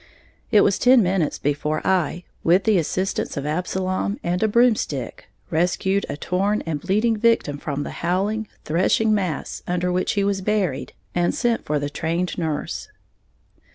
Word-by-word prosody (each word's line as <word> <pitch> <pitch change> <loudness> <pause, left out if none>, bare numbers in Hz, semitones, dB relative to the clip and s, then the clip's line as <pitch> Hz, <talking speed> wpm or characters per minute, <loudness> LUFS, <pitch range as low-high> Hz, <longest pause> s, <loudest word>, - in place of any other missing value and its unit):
It 210 -3 +6
was 200 -1 +2
ten 250 -2 +6
minutes 180 -4 0
before 145 +2 -1
I, 180 -2 +1 0.2
with 180 +4 +4
the 210 -3 +3
assistance 185 +1 -2
of 140 - -3
Absalom 185 +5 -1
and 175 +1 -1
a 220 - +3
broomstick, 235 +1 +1 0.2
rescued 180 +4 +1
a - - -4
torn 195 +6 0
and 155 -3 -3
bleeding 215 +5 +2
victim 210 -10 +2
from 145 -1 -3
the - - -6
howling, 200 +5 0 0.2
threshing 190 +7 +2
mass 185 -7 -2
under 180 0 0
which 180 +1 0
he 200 - +1
was 200 -1 0
buried, 190 -8 -1 0.2
and 175 0 +1
sent 235 -1 0
for 150 - 0
the 145 0 -3
trained 170 +4 -2
nurse. 150 - -3
185 Hz, 155 wpm, -22 LUFS, 160-205 Hz, 0.2 s, It